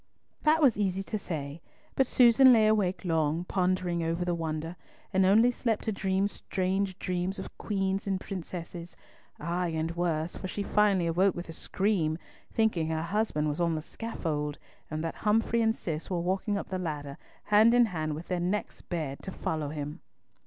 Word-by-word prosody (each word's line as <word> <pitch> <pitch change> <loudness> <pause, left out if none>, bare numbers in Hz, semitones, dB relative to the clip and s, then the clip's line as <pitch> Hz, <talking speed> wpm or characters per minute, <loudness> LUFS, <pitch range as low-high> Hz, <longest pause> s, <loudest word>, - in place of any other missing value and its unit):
That 310 +1 +4
was 250 -7 +5
easy 195 -1 0
to 215 +2 -3
say, 150 -4 -5 0.3
but 265 - +2
Susan 255 +1 +7
lay 225 -3 +6
awake 200 -3 +1
long, 160 -1 +1
pondering 180 -2 0
over 165 +2 -1
the 175 - 0
wonder, 165 0 -3 0.4
and 190 0 +4
only 225 +5 +6
slept 230 -3 -1
to 220 - -1
dream 195 -1 +1
strange 190 -1 -2
dreams 185 +1 -2
of - - -8
queens 195 -1 -1
and 190 -1 0
princesses, 175 -2 -7 0.4
ay, 175 +3 -1
and 160 0 -2
worse, 170 -1 -1
for 185 - -5
she 200 +2 -3
finally 200 -4 +3
awoke 180 +3 +2
with 175 -1 -6
a - - -6
scream, 175 -3 0 0.3
thinking 215 -8 +1
her 160 0 -1
husband 190 -5 0
was 150 +3 -2
on 170 -1 +2
the 155 - -2
scaffold, 155 -10 -3 0.3
and 155 0 -3
that 165 - -2
Humfrey 225 +2 +2
and 225 0 +2
Cis 160 -2 -4
were 180 -2 0
walking 190 +4 0
up - - -5
the 185 -1 -2
ladder, 145 -5 -4 0.3
hand 215 +3 +5
in 245 -1 +6
hand 155 -7 -3
with 160 +3 -8
their 180 -1 -1
necks 185 +4 -2
bared, 155 -6 -4
to 190 - -6
follow 155 -5 -3
him! 150 +2 -5
180 Hz, 180 wpm, -29 LUFS, 165-205 Hz, 0.4 s, Susan